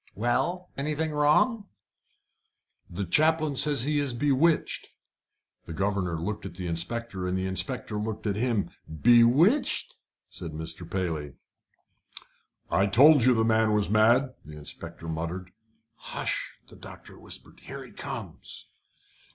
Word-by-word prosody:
"Well? 175 - -1
Anything 155 +3 -1
wrong?" 155 +9 +2 1.2
"The 95 +3 -4
chaplain 155 - +3
says 145 -2 +3
he 150 +1 +1
is 140 -4 -2
bewitched." 145 +5 +1 0.8
The 80 - -6
governor 95 -4 -1
looked 105 +5 -4
at 95 - -8
the 90 0 -6
inspector, 95 +3 -3
and 90 +1 -1
the 95 - -2
inspector 105 +3 -2
looked 110 +1 -4
at 100 -2 0
him. 115 -2 0 0.2
"Bewitched?" 120 - +4 0.3
said 80 - -8
Mr. 80 +2 -6
Paley. 80 -7 -3 1.4
"I 100 - +3
told 140 +6 +6
you 125 -1 +5
the 110 0 +2
man 110 -1 +3
was 105 -1 +1
mad," 120 +5 +4
the 75 0 -11
inspector 75 +2 -8
muttered. 85 +3 -4 0.5
"Hush!" - - -3
the - - -16
doctor - - -12
whispered. - - -8
"Here - - -9
he - - -15
comes." - - -6
110 Hz, 130 wpm, -27 LUFS, 90-145 Hz, 1.4 s, told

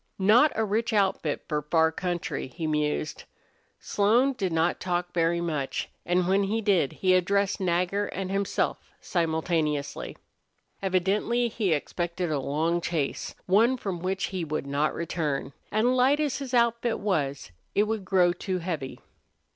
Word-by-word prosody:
"Not 225 +10 +5
a 220 - +1
rich 225 +3 0
outfit 190 -7 0
for 150 - 0
a - - -6
far 160 +2 +2
country," 175 -2 -3
he 145 +6 -6
mused. 150 0 -1 0.5
Slone 235 +7 +2
did 195 -8 -2
not 165 +1 +1
talk 175 -1 -2
very 170 0 +2
much, 150 -5 -2 0.2
and 175 0 +2
when 195 +1 +3
he 215 +3 0
did 195 -10 +2
he 185 -1 +2
addressed 200 +3 +2
Nagger 185 +2 0
and 190 0 -4
himself 200 0 0 0.2
simultaneously. 160 -3 -1 0.6
Evidently 200 +6 +1
he 210 -5 -1
expected 170 +3 -2
a 145 - 0
long 160 +5 0
chase, 160 -5 -2
one 225 +7 +4
from 195 -7 -4
which 190 +2 -2
he 185 -2 -2
would 155 -2 -3
not 145 +2 0
return, 150 -5 -2 0.2
and 235 +4 +2
light 265 +4 +4
as 295 -3 0
his 265 -2 -3
outfit 235 0 +2
was 140 - -2 0.2
it 205 - +5
would 215 -1 -2
grow 180 -2 +3
too 185 +1 -3
heavy. 165 -7 -4
180 Hz, 155 wpm, -27 LUFS, 160-205 Hz, 0.6 s, Not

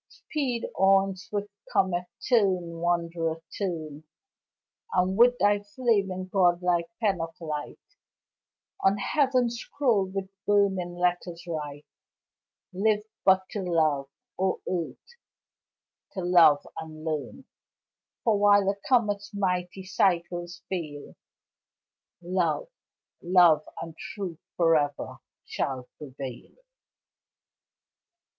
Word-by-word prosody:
Speed 255 -6 -3
on! 195 0 +4
swift 205 +2 -5 0.2
comet 180 -2 +1 0.2
turn, 185 -8 +2
wanderer, 170 -1 0 0.2
turn! 160 -6 -4 0.9
And 185 +1 +2
with 245 +3 +6
thy 205 -1 +3
flaming, 205 -4 0
god 180 -2 +3
like 175 -1 +1
pen 200 -6 +1
of 165 0 -6
light 155 -3 -5 1.1
On 195 +1 +4
heaven's 250 +1 +1
scroll 235 -11 +1
with 190 0 -4 0.2
burning 190 -4 +2
letters 175 -1 -1
write: 150 -3 -5 0.9
Live 210 +2 +2 0.2
but 190 -1 +4
to 205 - -3
love, 155 -6 +1 0.3
O 190 0 +1
earth! 175 -3 -3 1.1
to 190 - -3
love 170 -5 +5
and 155 0 -9
learn, 155 - -4 0.8
For 220 -3 +3
while 205 -1 +5
a - - -7
comet's 210 -5 +2
mighty 180 -1 -1
cycles 175 -2 0
fail, 155 -6 -5 1.1
Love, 180 - 0 0.5
love 175 -4 +5
and 165 -1 -7
truth 180 -3 -6 0.2
forever 155 -4 +1 0.3
shall 130 -2 -3
prevail. 135 -4 -8
180 Hz, 100 wpm, -27 LUFS, 165-200 Hz, 1.1 s, with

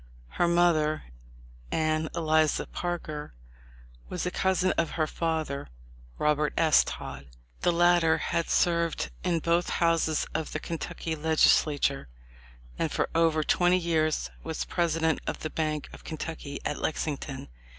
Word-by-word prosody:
Her 175 - +1
mother, 170 -3 +3 0.7
Anne 155 0 0
Eliza 155 -2 +2
Parker, 155 - -5 0.7
was 180 - -3
a 180 - -1
cousin 190 0 +1
of 165 - 0
her 155 - +2
father, 155 -3 -2 0.5
Robert 150 0 +1
S. 160 -2 +5
Todd. 70 +1 -7 0.3
The 175 - +2
latter 175 -1 +4
had 170 -1 -1
served 170 - +1
in 170 - +1
both 170 +2 +1
houses 165 -2 +1
of 160 -1 -3
the - - -2
Kentucky 165 0 -4
Legislature, 150 - +3 0.7
and - - 0
for - - -1
over 160 -1 +3
twenty 175 +3 +3
years 155 - 0
was - - -3
president 160 - +1
of - - -3
the 155 - -4
Bank 155 -2 -2
of - - -12
Kentucky 155 -2 -6
at 150 - -2
Lexington. 145 -3 -3
160 Hz, 130 wpm, -28 LUFS, 155-170 Hz, 0.7 s, S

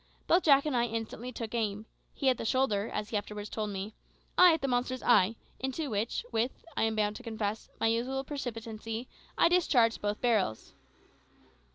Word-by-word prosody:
Both 355 +2 +3
Jack 280 -2 +6
and 295 -4 0
I 240 0 +3
instantly 230 +2 -4
took 230 -2 -6
aim 215 -2 -1 0.3
he 275 - -2
at 255 - +1
the - - -3
shoulder, 225 -3 +1
as 210 0 -3
he 215 - 0
afterwards 205 0 -5
told 215 -1 -2
me; 200 +2 -5 0.4
I 360 -1 +8
at 320 -3 0
the - - +1
monster's 255 0 -1
eye, 220 -2 +4 0.2
into 265 +2 -3
which, 215 +2 -1
with, 230 +2 -1
I - - +2
am 220 0 0
bound 210 -1 0
to - - -10
confess, 220 -2 -3
my - - +1
usual 245 +4 0
precipitancy, 230 -4 -5 0.3
I - - +6
discharged 265 -10 +3
both 205 0 -1
barrels. 215 - 0
230 Hz, 185 wpm, -30 LUFS, 215-255 Hz, 0.4 s, I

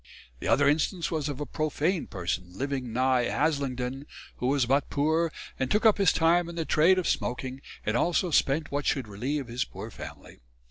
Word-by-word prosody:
The - - -4
other 145 0 +4
instance 160 +3 +1
was 155 -3 -1
of 145 -1 -5
a 150 - -2
profane 155 +5 -1
person 90 -1 -4
living 135 -3 -3
nigh 130 +1 +2
Haslingdon 135 -3 -1 0.3
(who 125 - -1
was 135 -1 +2
but 135 +3 +1
poor) 160 +3 +1 0.3
and 130 -1 0
took 210 +2 +1
up 215 -2 +5
his 195 -4 +5
time 170 +1 +3
in 170 - -8
the 165 -1 -2
trade 170 +6 +4
of 185 - 0
smoking 130 +2 -2 0.2
and 110 - 0
also 175 +6 +1
spent 145 +1 +2
what 145 0 -2
should 135 -4 +1
reliev 125 +7 -3
his 120 +1 -1
poor - - -9
family. - - -10
145 Hz, 190 wpm, -28 LUFS, 125-160 Hz, 0.3 s, up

